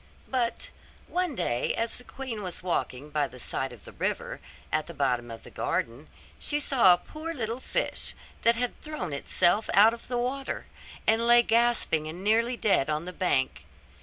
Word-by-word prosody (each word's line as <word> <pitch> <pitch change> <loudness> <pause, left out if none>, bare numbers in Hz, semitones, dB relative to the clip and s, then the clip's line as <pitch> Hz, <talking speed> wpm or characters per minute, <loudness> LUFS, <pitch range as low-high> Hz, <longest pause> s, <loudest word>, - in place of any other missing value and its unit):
But 245 -3 -1 0.4
one 360 -5 -1
day 120 - 0
as 230 +1 -1
the - - -8
queen 250 -5 -6
was 180 -2 -5
walking 150 -5 -2
by 145 -1 +1
the 130 - -13
side 130 +1 -2
of 120 -4 -13
the - - -9
river, - - -3 0.3
at 155 0 0
the 170 - -8
bottom 125 -4 0
of 115 0 -8
the - - -12
garden, 120 +7 -2 0.3
she 295 - 0
saw 255 -10 +5
a 175 - +6
poor 320 - -7
little 230 -1 -2
fish, - - -1 0.3
that 235 0 +5
had 245 +1 -2
thrown 300 - -5
itself 175 +8 +2
out 215 +3 +8
of 235 - -10
the 245 - -1
water, 265 +3 -2 0.4
and 225 +2 +3
lay 240 0 +7
gasping 230 -9 +2
and 170 +4 -7
nearly 230 +4 +3
dead 195 -11 +2
on 155 +2 -1
the 180 - -6
bank. 140 -8 0
215 Hz, 185 wpm, -28 LUFS, 155-240 Hz, 0.4 s, out